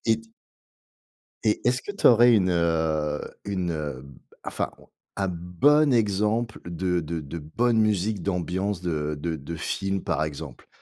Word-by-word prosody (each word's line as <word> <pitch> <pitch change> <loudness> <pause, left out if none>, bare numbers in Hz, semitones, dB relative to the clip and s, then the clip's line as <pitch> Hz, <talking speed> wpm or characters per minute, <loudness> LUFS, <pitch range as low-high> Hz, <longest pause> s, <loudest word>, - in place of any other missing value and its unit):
Et 115 -1 +3
t 115 0 -20 1.1
et 105 -1 +2
est-ce 125 0 +2
que - - -6
tu 200 - +4
aurais 120 0 +7
une, 95 -4 +3
heu, 80 -3 +1 0.2
une, 95 -4 -1
heu, 75 -5 -4
b 70 -2 -14 0.3
enfin, - - -2 0.5
un 95 -1 0
bon 90 - +3
exemple 105 +1 +1
de 90 +1 -1
de 85 +1 -4
de 75 +4 -7
bonne 115 +10 +1
musique 105 -1 +1
d'ambiance, 95 +1 -1
de 75 -4 -2
de 85 +1 -2
de 75 +4 -7
film, 95 +4 -2
par - - 0
exemple? 75 -2 -7
90 Hz, 155 wpm, -25 LUFS, 80-110 Hz, 1.1 s, aurais